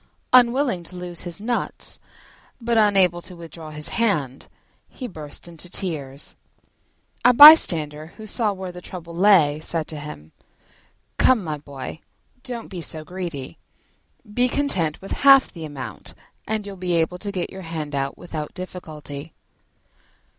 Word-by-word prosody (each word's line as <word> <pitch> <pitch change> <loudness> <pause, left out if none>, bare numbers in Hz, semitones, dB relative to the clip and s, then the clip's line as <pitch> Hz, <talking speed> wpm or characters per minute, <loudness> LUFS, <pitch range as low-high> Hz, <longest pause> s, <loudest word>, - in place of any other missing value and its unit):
Unwilling 250 -4 +4
to 170 +2 -11
lose 180 -1 -7
his 175 0 -6
nuts 240 +3 -3 0.6
but 235 -1 -1
unable 195 -5 +4
to 180 +1 -10
withdraw 165 -2 -10
his 150 0 -6
hand, 150 - -1 0.4
he 255 - -7
burst 155 -5 -10
into 170 +1 -8
tears. 150 -7 -4 0.9
A 250 - +7
bystander, 160 - +8
who 220 - -9
saw 215 0 +1
where 190 -2 -6
the 180 0 -10
trouble 175 -2 -9
lay, 170 -6 +5
said 160 0 -2
to 155 - -5
him, 80 - -9 0.9
"Come, 250 -6 +4
my 155 -3 -4
boy, 140 +1 -8 0.4
don't 245 -3 -6
be 180 -3 -6
so 155 -1 -2
greedy: 170 - -6 0.7
be 245 +3 +2
content 185 - 0
with 195 - -10
half 275 -1 +6
the 165 -3 -7
amount, 140 -4 -7 0.3
and 215 -1 -1
you'll 200 -1 -8
be 180 -1 -2
able 170 +2 0
to 200 +1 -4
get 185 -3 -3
your 190 - -8
hand 160 -4 -5
out 140 0 -2
without 155 -4 -6
difficulty." 155 -5 -8
175 Hz, 145 wpm, -23 LUFS, 155-205 Hz, 0.9 s, bystander